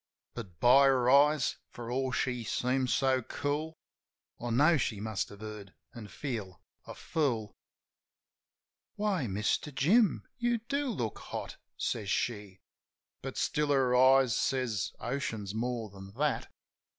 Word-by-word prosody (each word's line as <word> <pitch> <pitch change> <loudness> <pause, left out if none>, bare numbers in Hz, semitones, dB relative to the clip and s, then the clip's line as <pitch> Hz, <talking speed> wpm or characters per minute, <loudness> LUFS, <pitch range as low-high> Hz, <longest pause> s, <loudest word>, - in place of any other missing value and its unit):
But, 95 -9 -9
by 135 +5 +7
her 130 -2 +3
eyes, 145 0 +4
for 120 0 -7
all 130 +1 0
she 125 -2 -1
seemed 125 +3 0
so 130 -1 +2
cool, 150 +6 -3 0.6
I 120 - -4
know 145 +8 +5
she 120 -7 -1
must 110 -1 -2
have 100 0 -13
heard, 105 -3 -8 0.2
an' 115 -3 -9
feel 105 -7 -5 0.3
a - - -8
fool. 120 -10 -1 1.4
"Why, 200 - 0
Mister 105 +8 -1
Jim? 185 - +3
You 240 0 +1
do 280 +6 -2
look 120 - -3
hot," - - -6 0.2
says 105 -4 -2
she. 105 -4 -2 0.6
(But - - -6
still 150 0 0
her 130 -3 +3
eyes 130 -2 +5
says 125 -7 0
oceans 115 -6 -3
more 115 -1 -3
than 95 0 -11
that). 145 +4 -1
125 Hz, 135 wpm, -31 LUFS, 110-140 Hz, 1.4 s, by